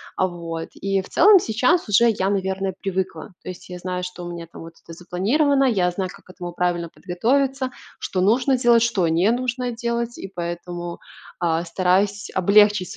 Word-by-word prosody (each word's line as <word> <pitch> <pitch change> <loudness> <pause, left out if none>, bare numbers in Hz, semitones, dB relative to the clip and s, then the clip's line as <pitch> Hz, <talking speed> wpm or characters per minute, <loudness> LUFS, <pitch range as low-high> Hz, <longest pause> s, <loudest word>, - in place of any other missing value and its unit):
А, 185 - +1
вот, 165 -2 -6
и, 195 0 -1
в 190 - -13
целом, 405 +2 +7
сейчас, 250 +4 +1
уже, 220 +4 +5
я, 195 -2 -1
наверное, 190 -1 -1
привыкла. 190 -1 -3
То - - -8
есть, 180 - -9
я 180 0 -7
знаю, 180 0 -4
что 180 -1 -7
у 175 - -6
меня, 170 -1 -7
там, - - -11
вот 165 0 -10
это 165 - -11
запланировано, 250 - +1
я 200 -9 +2
знаю, 185 +1 -3
как - - -17
к - - -25
этому 175 -2 -7
правильно 175 -1 -1
подготовиться, 260 - -1 0.3
что 185 - -2
нужно 245 +7 +3
делать, 240 -2 +4
что 205 -7 +1
не 170 +7 +3
нужно 250 0 -2
делать. 235 0 -3
И, 195 - -8
поэтому, 175 0 -5 0.4
а, 170 -1 0
стараюсь 190 +4 +1
облегчить 200 0 +4
190 Hz, 185 wpm, -22 LUFS, 175-235 Hz, 0.4 s, целом